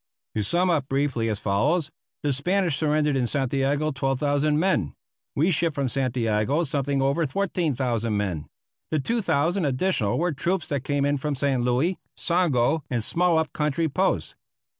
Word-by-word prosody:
To 110 - -1
sum 175 - +2
up 145 -6 0
briefly 135 -5 0
as 105 -2 -2
follows: 140 - +1 0.3
The 145 -1 +1
Spanish 175 +4 +1
surrendered 150 -1 +1
in 125 -2 +1
Santiago 140 +3 0
12,000 145 +2 +1
men. 135 - +1 0.4
We 165 +6 +2
shipped 160 -1 +1
from 140 -2 0
Santiago 125 +2 0
something 140 -2 -1
over 140 +4 +1
14,000 130 - -1
men. 90 -7 -2 0.4
The 155 - 0
2,000 175 - 0
additional 135 - 0
were 175 +2 +1
troops 170 +4 -1
that 140 -3 -1
came 140 0 0
in 145 0 +1
from 145 +1 -2
San 135 -2 0
Luis, 130 +10 +1 0.2
Songo, 160 -5 +2
and 120 -4 -1
small 175 +5 +2
up 160 -1 -1
country 150 +2 0
posts. 185 +6 0
145 Hz, 155 wpm, -25 LUFS, 130-165 Hz, 0.4 s, sum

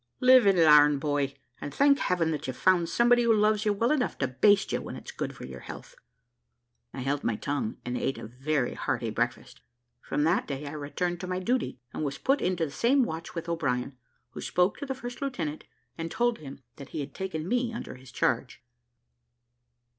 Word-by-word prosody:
Live 255 -3 +7
and 195 -2 +5
larn, 150 -3 +7
boy, 140 -1 -1 0.2
and 145 - -6
thank 280 - +4
Heaven 170 -3 +1
that 150 -3 -3
you've 130 - -4
found 180 -3 +3
somebody 240 +5 +4
who 235 -1 +3
loves 215 0 +2
you 210 - +3
well 230 +4 +1
enough 280 -5 0
to 130 - 0
baste 195 +10 +3
you - - -1
when - - -7
it's - - -9
good - - -5
for - - -9
your - - -9
health." - - -10 1.0
I 135 - -6
held 140 +2 -1
my 115 - 0
tongue 140 -2 -3
and 125 0 -3
ate 135 - -1
a - - -7
very 130 +3 -1
hearty 115 -2 -2
breakfast. 120 +3 -3 0.4
From 145 - -1
that 165 +5 +2
day 140 0 -4
I 140 - -5
returned 160 +4 -3
to 185 - -5
my 185 0 -2
duty, 240 - -1 0.2
and - - -3
was 140 -2 -3
put 275 +2 +1
into 180 -2 0
the 145 - -7
same 260 - +3
watch 165 -5 -5
with 170 0 -5
O'Brien, 135 -6 -1 0.4
who - - -8
spoke 180 +2 +1
to 285 - -5
the 265 - -2
first 245 -1 -8
lieutenant, 170 - -3 0.3
and 165 0 -3
told 240 +4 0
him 135 -2 -10
that 140 - -10
he 155 - -4
had 140 0 -7
taken 170 -4 -4
me 245 +2 0
under 235 - -6
his 130 0 -14
charge. - - -1
165 Hz, 205 wpm, -28 LUFS, 140-225 Hz, 1.0 s, Live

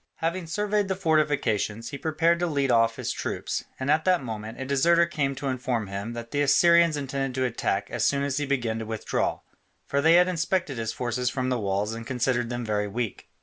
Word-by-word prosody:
Having 170 +1 -2
surveyed 205 +3 0
the 190 - -1
fortifications, 145 - 0
he 140 - -5
prepared 165 +3 +2
to 175 - +1
lead 140 -4 +1
off 115 -1 +3
his - - -3
troops, - - -3
and 130 +2 0
at 155 +1 +3
that 180 -5 +2
moment 110 -1 -6
a 130 - -3
deserter 170 +6 +4
came 145 -5 -1
to 140 +1 -4
inform 125 -3 -1
him 100 +4 -5
that 115 0 -7
the 145 - 0
Assyrians 170 +2 +5
intended 135 -2 -3
to 130 - +2
attack 100 -4 -1
as - - -1
soon 140 0 +2
as 140 -1 -1
he 145 -1 -1
began 120 -5 -1
to 110 - -5
withdraw, 110 -1 -2 0.4
for 140 - 0
they 160 +3 +5
had 180 +1 +6
inspected 170 -5 -1
his 110 -1 -2
forces 125 +1 -1
from 130 0 -2
the 125 -2 0
walls 100 +1 -1
and 115 0 -7
considered 120 -1 0
them 120 -1 -3
very 105 -1 0
weak. 115 +1 -4
135 Hz, 215 wpm, -26 LUFS, 115-160 Hz, 0.4 s, had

